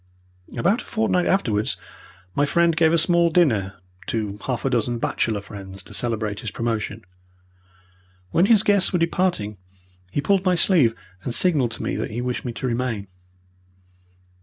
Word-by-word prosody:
About 205 +8 +2
a - - -13
fortnight 215 -5 0
afterwards 110 - +1 0.6
my 145 - +1
friend 170 +2 +2
gave 160 -1 +4
a 170 - +3
small 170 +1 +3
dinner 110 - +2 0.3
to 105 -3 -3
half 130 -1 -2
a - - +2
dozen 120 0 0
bachelor 110 -2 -1
friends 95 -2 -9
to - - -12
celebrate 110 -3 -1
his 110 - -4
promotion. 110 -2 -3 1.3
When 180 +4 +3
his 220 -2 +6
guests 200 -3 +3
were 180 - +2
departing 165 - 0 0.5
he 120 - -2
pulled 190 +6 +2
my 185 -2 +2
sleeve 155 - +4 0.3
and 120 - -2
signalled 150 -10 +4
to - - -6
me - - -2
that - - -3
he 110 - -5
wished 125 +1 -3
me 120 - -2
to 120 - -6
remain. 115 -5 -2
125 Hz, 160 wpm, -23 LUFS, 110-170 Hz, 1.3 s, his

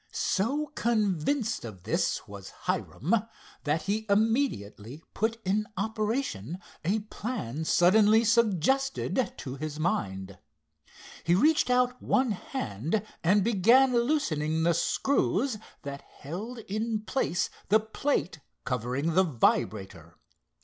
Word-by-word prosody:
So 280 +10 0
convinced 220 - 0
of 100 -6 -9
this - - -1
was - - -9 0.2
Hiram, 170 - -1 0.5
that 150 +2 0
he 215 +2 -2
immediately 200 - 0
put 225 +2 -1
in 210 +3 +1
operation 215 - -2 0.3
a 200 +7 +1
plan 205 - -5
suddenly 210 +7 +5
suggested 235 - +1
to 130 0 -6
his 155 +1 -5
mind. 95 - -2 0.8
He 170 - +3
reached 300 - +3
out 250 0 +2
one 255 -3 +2
hand 175 - -3 0.2
and 190 +4 +4
began 235 +5 +5
loosening 160 - +1
the 170 +1 +4
screws 235 - +1 0.2
that 140 -1 -6
held 200 - -8
in 215 +1 -2
place 215 -6 -1 0.2
the 215 +2 +6
plate 220 - -2 0.3
covering 125 +5 -1
the 190 +3 +5
vibrator. 95 - -1
200 Hz, 110 wpm, -28 LUFS, 155-230 Hz, 0.8 s, the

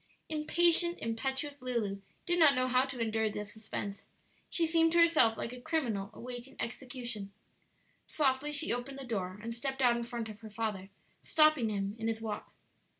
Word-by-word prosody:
Impatient, 340 +2 +3
impetuous 265 +5 -2
Lulu 225 -6 -2 0.2
did 350 0 +1
not 300 -4 +7
know 255 0 +2
how 255 +1 +4
to 265 -2 -6
endure 220 -1 +1
the 210 0 -4
suspense; 205 -1 -6 0.4
she 335 - +1
seemed 325 0 +4
to - - +3
herself 325 -10 +5
like 230 - -4
a 250 - -9
criminal 245 -10 -1
awaiting 245 +2 -8
execution. 240 -5 -5 0.8
Softly 280 0 +1
she 295 -1 +1
opened 250 +3 -4
the 275 - -6
door 190 -5 -3
and 230 0 -3
stepped 265 +3 -3
out 245 -2 +5
in 235 - -2
front 235 -1 -4
of 215 -1 -9
her 220 -1 -9
father, 210 -3 -3 0.3
stopping 305 -7 +4
him 200 -1 -2
in 225 - -2
his 225 -1 -1
walk. 220 -2 -5
245 Hz, 175 wpm, -32 LUFS, 220-285 Hz, 0.8 s, not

